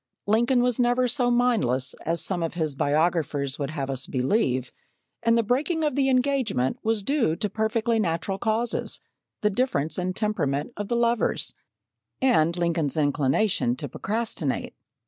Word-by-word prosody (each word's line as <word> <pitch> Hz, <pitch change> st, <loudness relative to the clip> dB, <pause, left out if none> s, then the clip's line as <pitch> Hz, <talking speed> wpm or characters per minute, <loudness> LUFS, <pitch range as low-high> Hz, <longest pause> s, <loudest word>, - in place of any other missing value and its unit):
Lincoln 240 Hz, +4 st, +3 dB
was 250 Hz, -1 st, +1 dB
never 245 Hz, +1 st, +3 dB
so 245 Hz, 0 st, +1 dB
mindless 215 Hz, -, +2 dB
as 165 Hz, +1 st, +1 dB
some 185 Hz, -3 st, -1 dB
of 165 Hz, +1 st, -3 dB
his 160 Hz, -4 st, -1 dB
biographers 145 Hz, -1 st, 0 dB
would 140 Hz, -1 st, -2 dB
have 140 Hz, -3 st, -3 dB
us 135 Hz, -1 st, -3 dB
believe, 130 Hz, -, 0 dB, 0.5 s
and 230 Hz, 0 st, +3 dB
the 230 Hz, -, +3 dB
breaking 300 Hz, -, 0 dB
of 300 Hz, -, +1 dB
the 270 Hz, 0 st, +2 dB
engagement 250 Hz, -, +1 dB
was 220 Hz, -2 st, 0 dB
due 265 Hz, -, +1 dB
to 210 Hz, +4 st, -2 dB
perfectly 220 Hz, +1 st, 0 dB
natural 190 Hz, +1 st, -1 dB
causes 225 Hz, +2 st, 0 dB, 0.4 s
the 210 Hz, -, +2 dB
difference 190 Hz, -, 0 dB
in 185 Hz, 0 st, -1 dB
temperament 155 Hz, -, -1 dB
of 205 Hz, -1 st, -4 dB
the 235 Hz, -, -1 dB
lovers, 235 Hz, 0 st, 0 dB, 0.7 s
and 170 Hz, -10 st, +3 dB
Lincoln's 165 Hz, -4 st, 0 dB
inclination 145 Hz, -, +1 dB
to 145 Hz, +3 st, -5 dB
procrastinate. 200 Hz, -, -3 dB
200 Hz, 150 wpm, -25 LUFS, 150-240 Hz, 0.7 s, Lincoln